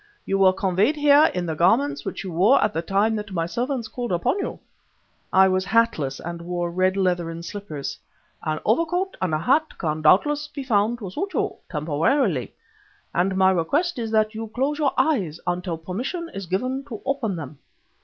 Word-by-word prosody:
You 195 - 0
were 190 -1 +6
conveyed 190 - +1
here 295 +1 +5
in 180 -1 -1
the 160 - -2
garments 145 -4 +2
which - - -5
your 185 -3 -6
wore 200 +11 +4
at 210 - +1
the 165 - -1
time 200 +5 +1
that 210 -1 -6
my 165 -2 0
servants 240 - -2
called 240 -1 -5
upon 175 - +1
you." - - -3 0.7
(I 190 0 +6
was 185 0 +1
hatless 195 -11 +1
and 170 0 -6
wore 175 0 -3
red 185 +2 +1
leathern 175 -3 -1
slippers.) 170 -7 -6 0.4
"An 155 -1 -2
overcoat 335 - +1
and 185 -3 0
a 155 - +2
hat 280 - +1
can 155 -2 -2
doubtless 295 - +3
be 285 -2 -7
found 225 -1 +1
to 200 -6 -7
suit 385 - -4
you, - - 0 0.2
temporarily, 160 - 0 0.6
and 190 +2 +1
my 190 0 +5
request 285 - 0
is 225 -1 -3
that 215 0 +2
you 225 +1 -5
close 280 +4 0
your 285 -3 +2
eyes 190 - +1
until 175 -1 -2
permission 250 - -4
is 195 -2 -6
given 255 +9 -1
to 235 -7 -7
open 265 -8 -1
them." 145 -3 -8
195 Hz, 185 wpm, -23 LUFS, 170-255 Hz, 0.7 s, were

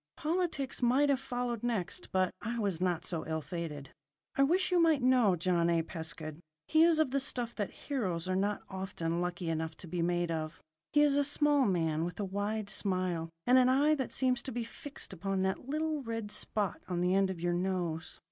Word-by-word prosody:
Politics 315 -5 -1
might 260 +4 +4
have 275 -2 +3
followed 245 -3 -3
next; 230 -7 -2
but 185 -1 +2
I 235 +2 -3
was 200 -6 -1
not 180 -3 0
so 165 -3 -2
ill 160 -1 -2
fated. 150 -2 -5 0.4
I - - +2
wish 355 +7 +3
you 355 -1 +4
might 315 -5 +4
know 250 -7 +5
John 170 0 +2
A. 165 -1 +2
Pescud. 160 -2 -6 0.3
He 315 - +4
is 330 -1 +6
of 315 -5 +2
the 275 - +2
stuff 245 -3 -1
that 205 -3 -2
heroes 185 - -3
are 185 - 0
not 200 +2 0
often 180 -3 -3
lucky 180 0 -3
enough 160 0 -2
to 180 - -10
be 175 +1 -2
made 175 0 +1
of. 155 -1 -3 0.3
He 295 - +5
is 285 -1 +4
a 285 - +4
small 290 -1 +3
man 165 -4 +1
with 175 +2 -4
a 205 - 0
wide 205 +2 -2
smile, 185 -5 -1 0.2
and 255 +1 +6
an 255 0 +5
eye 285 +4 +4
that 270 -4 -2
seems 255 -2 +1
to 265 - -6
be 240 0 -2
fixed 280 +5 -7
upon 195 +1 -1
that 190 +7 -2
little 310 0 -1
red 225 -4 -4
spot 205 -4 -2
on 175 -1 -1
the 180 +1 +2
end 195 0 +3
of 185 -3 -4
your 175 +1 0
nose. 175 -3 -2
195 Hz, 210 wpm, -32 LUFS, 175-260 Hz, 0.4 s, is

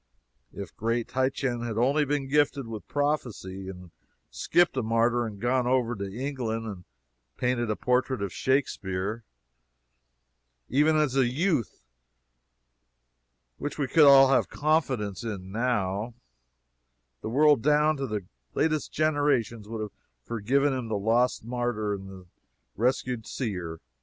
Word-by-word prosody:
If 100 - -8
great 115 +1 -1
Titian 130 -2 -1
had 115 -2 -4
only 140 +6 +3
been 145 -1 -1
gifted 140 -1 +2
with 110 -2 -8
prophecy, 120 -10 -2
and 90 -1 -8
had 90 -2 -15 0.4
skipped 175 -3 +2
a 130 - +1
martyr, 115 +1 +1
and 105 -2 -8
gone 125 +2 +1
over 125 -2 +1
to 100 -1 -5
England 120 -2 -3
and 95 -5 -7 0.5
painted 125 -2 0
a 105 - +1
portrait 125 +2 0
of 100 - -4
Shakspeare, 110 -5 -1 1.4
even 150 +4 +3
as 150 -4 +2
a 130 -3 +4
youth, 140 - -1 1.8
which 145 - -4
we 145 - 0
could 150 +4 +5
all 135 -1 +8
have 135 - +3
confidence 130 - 0
in 95 -5 -5
now, 110 -1 -1 1.1
the - - -4
world 145 +1 +4
down 150 +2 +3
to 135 0 -3
the 105 -4 -4 0.3
latest 155 -1 0
generations 140 -8 0
would 110 -1 -4
have 105 - -5 0.3
forgiven 130 - +1
him 130 -3 -3
the 110 -2 -1
lost 115 +3 +1
martyr 120 -4 -1
in 95 -1 -6
the 95 -1 -11 0.5
rescued 125 0 -1
seer. 90 -9 -4
120 Hz, 135 wpm, -27 LUFS, 105-135 Hz, 1.8 s, all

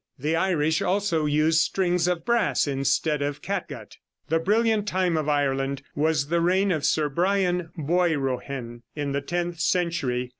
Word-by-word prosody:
The 150 +5 -1
Irish 160 -3 +1
also 180 -5 0
used 155 +2 +3
strings 180 0 +1
of 175 -2 -1
brass 235 -9 +1
instead 140 +2 0
of 145 0 -3
catgut." - - -5 0.3
The 165 +1 +2
brilliant 215 +3 +1
time 185 -3 +1
of 155 -1 -1
Ireland 140 -1 0
was 150 -1 0
the 170 +1 +1
reign 190 +3 +2
of 155 -4 -1
Sir 155 -1 +1
Brian 180 +2 0
Boirohen, 140 -7 -1
in 145 -2 -3
the 140 +1 -1
tenth 175 +3 -3
century. 160 -8 0
160 Hz, 150 wpm, -25 LUFS, 140-180 Hz, 0.3 s, used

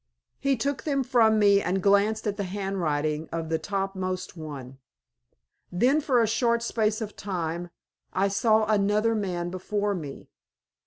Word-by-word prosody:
He 275 -1 +1
took 280 +4 -1
them 280 -3 0
from 230 -4 +4
me 200 -1 +5
and 190 +1 0
glanced 200 +3 +2
at 205 -2 -1
the 200 - -3
handwriting 165 -6 -2
of 165 -1 -3
the 160 0 0
topmost 195 -2 -3
one. 140 -5 -8 0.9
Then 250 +12 +3
for 255 -6 +3
a - - +1
short 235 +1 +1
space 220 -2 0
of 215 -1 -5
time 175 -3 -4 0.4
I 195 +1 +1
saw 215 +2 +3
another 210 +1 +2
man 180 -5 -2
before 205 +2 -1
me. 150 -7 -7
200 Hz, 150 wpm, -26 LUFS, 175-220 Hz, 0.9 s, me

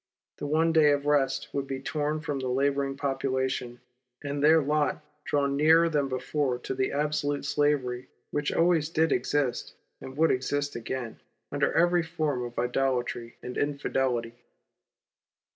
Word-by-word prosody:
The - - -3
one 160 +2 +2
day 155 -2 +6
of 145 0 -2
rest 140 -2 +1
would 140 -1 -2
be 135 -1 -4
torn 150 +2 -2
from 145 -4 -3
the 130 - -3
labouring 135 +1 0
population, 130 -3 -2 0.4
and 145 0 -3
their 160 +2 +7
lot 150 +1 0 0.2
drawn 140 -1 +1
nearer 160 +3 +5
than 145 -3 +1
before 130 0 -1
to 125 - -5
that 130 0 -1
absolute 145 -1 -1
slavery 135 -4 0 0.2
which 145 0 -1
always 165 -2 +2
did 160 -1 +1
exist, 130 0 -1 0.3
and 130 +1 -9
would 160 +1 +4
exist 145 +3 -1
again, 120 0 -5 0.3
under - - +1
every 175 +1 +3
form 155 -6 -2
of 120 0 -7
Idolatry 125 -2 -1
and 125 - -4
Infidelity. 135 -5 -1
140 Hz, 145 wpm, -28 LUFS, 130-150 Hz, 0.4 s, their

